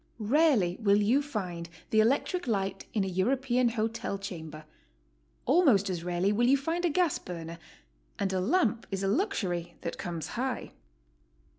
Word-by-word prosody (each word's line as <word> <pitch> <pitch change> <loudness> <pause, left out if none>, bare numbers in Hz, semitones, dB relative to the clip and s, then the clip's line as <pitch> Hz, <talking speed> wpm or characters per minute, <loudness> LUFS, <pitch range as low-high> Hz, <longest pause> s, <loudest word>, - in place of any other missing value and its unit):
Rarely 260 - +4
will 205 -2 +4
you 230 +7 +3
find 180 - -5 0.2
the 220 - +4
electric 275 - +1
light 195 -4 -2
in 210 - 0
a - - -2
European 245 +6 +1
hotel 225 -3 -2
chamber; 160 -5 -8 0.8
almost 250 - +4
as 170 -2 -4
rareTy 180 +3 +1
will 240 +3 +2
you 275 +2 +5
find 325 +6 -2
a - - +3
gas 340 -1 +1
burner; 165 -1 -7 0.6
and 195 -1 -1
a 185 - +1
lamp 235 - +1
is 195 -1 -3
a - - +1
luxury 190 - -1
that 170 - -5
comes 170 -2 -4
high. 255 +1 -3
210 Hz, 155 wpm, -29 LUFS, 180-265 Hz, 0.8 s, you